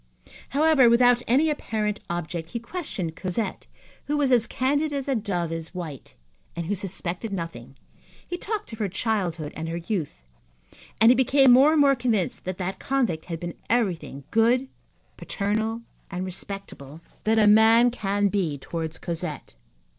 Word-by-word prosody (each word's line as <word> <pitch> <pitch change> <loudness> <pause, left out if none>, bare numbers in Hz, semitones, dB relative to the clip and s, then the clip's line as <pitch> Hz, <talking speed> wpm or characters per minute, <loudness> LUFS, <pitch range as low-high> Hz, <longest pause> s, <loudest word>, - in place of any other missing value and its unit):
However, 285 -3 +5
without 245 +1 +5
any 290 +6 +3
apparent 215 -7 -2
object, 170 -1 -4
he 235 - -4
questioned 230 - -5
Cosette, 185 +2 -3 0.4
who 295 +1 0
was 280 -3 +2
as 235 -3 +4
candid 290 +4 0
as 280 -1 -3
a 275 - +1
dove 190 -8 -2
is 165 +2 -5
white 160 -7 -7 0.4
and 170 0 -3
who 195 - -1
suspected 190 +1 -3
nothing; 140 -9 -6 0.5
he 355 - -3
talked 420 - -4
of 225 - -8
her 205 -3 0
childhood 180 -7 -2
and 160 0 -4
her 165 - -3
youth, 170 -2 -3 0.9
and 225 +2 +7
he - - +5
became 265 +1 +5
more 270 +5 +7
and 310 - +4
more 280 -1 +6
convinced 235 -7 -1
that 185 0 -3
that 190 +1 -4
convict 240 -12 -1
had 165 -2 -5
been 175 -1 -5 0.2
everything 185 - -1
good, 245 +4 +3 0.5
paternal 220 +3 -2 0.3
and 185 -1 -4
respectable 185 -6 -7 0.3
that 220 +1 +3
a 215 - +5
man 225 +3 +6
can 205 -3 0
be 180 -8 -1
towards 160 +3 -5
Cosette. 170 - -4
210 Hz, 160 wpm, -25 LUFS, 175-245 Hz, 0.9 s, and